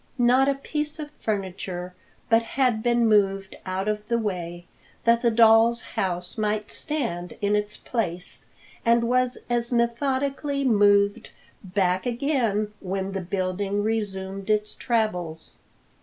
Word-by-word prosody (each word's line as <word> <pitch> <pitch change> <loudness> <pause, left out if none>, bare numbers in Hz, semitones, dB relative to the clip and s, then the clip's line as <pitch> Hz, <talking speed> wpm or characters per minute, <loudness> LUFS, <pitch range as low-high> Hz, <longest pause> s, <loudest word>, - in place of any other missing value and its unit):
Not 255 +2 +4
a 280 - +1
piece 300 +2 -3
of 300 -2 -7
furniture 185 -3 -3 0.3
but 225 0 +4
had 245 -1 0
been 235 0 +3
moved 195 -2 +2
out 190 +2 -2
of 210 0 -2
the 235 - +1
way 175 -5 -4 0.4
that 235 0 +4
the 235 - +4
doll's 225 +1 +5
house 180 0 -2
might 210 0 -1
stand 230 - -3
in 205 0 +1
its 210 0 -2
place, 180 -7 -4 0.4
and 235 0 +4
was 250 +1 +1
as 240 0 0
methodically 270 +4 0
moved 205 -3 +3 0.3
back 185 +1 0
again 235 -5 0
when 190 0 -3
the 195 -1 -3
building 195 +2 -1
resumed 195 -3 -3
its 210 0 +2
travels. 180 -9 -2
215 Hz, 130 wpm, -25 LUFS, 195-240 Hz, 0.4 s, doll's